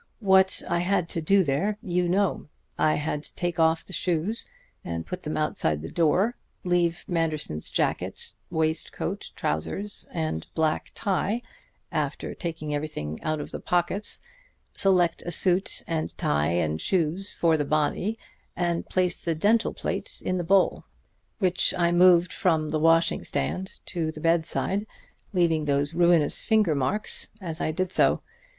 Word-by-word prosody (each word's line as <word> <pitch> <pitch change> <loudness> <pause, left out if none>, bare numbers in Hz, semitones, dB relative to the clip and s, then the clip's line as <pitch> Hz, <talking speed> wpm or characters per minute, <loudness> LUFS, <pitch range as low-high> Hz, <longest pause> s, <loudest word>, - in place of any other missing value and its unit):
"What 190 -3 +4
I 170 - +1
had 180 -1 +1
to 165 - -1
do 195 +4 +4
there 170 +8 0
you 180 -1 0
know. 195 -1 0 0.3
I 155 - +2
had 150 0 -2
to - - -7
take 175 -1 -2
off 160 0 +3
the 190 - -10
shoes 180 +6 0 0.3
and 85 -1 -4
put 180 - -6
them 155 -2 -4
outside 80 - 0
the 80 - -7
door, 185 +8 +2 0.3
leave 175 -1 0
Manderson's 155 - -1
jacket, - - -1 0.2
waistcoat, 160 -1 -2
trousers 195 - -2
and 155 - -3
black 160 -1 0
tie, 205 +4 -1 0.5
after - - -2
taking 160 -3 -5
everything 145 - -4
out 155 0 -1
of 145 - -6
the - - -5
pockets, 180 +4 -1 0.6
select 180 -3 +3
a 175 - -4
suit 185 +2 +2
and 160 -1 -3
tie 75 +1 +1
and 80 -2 0
shoes 185 +2 0
for 165 -2 +3
the 150 - 0
body, 155 +9 0 0.4
and 175 -1 -1
place 180 -1 +1
the 165 -2 -2
dental 215 +8 +2
plate - - -3
in 185 0 0
the - - -1
bowl, 190 +3 +2 0.5
which 185 -3 +2
I 170 -1 +2
moved 175 0 +5
from 160 -6 +1
the 155 - 0
washing 165 +1 +3
stand 185 - -2 0.2
to 165 -3 -1
the 155 - -10
bedside, 170 +5 +1 0.4
leaving 165 -5 +2
those 145 +1 0
ruinous 170 -3 +4
finger 215 -7 +3
marks 150 +10 -1
as 170 -4 -4
I - - 0
did 185 +3 -2
so. - - +4
170 Hz, 155 wpm, -26 LUFS, 155-185 Hz, 0.6 s, moved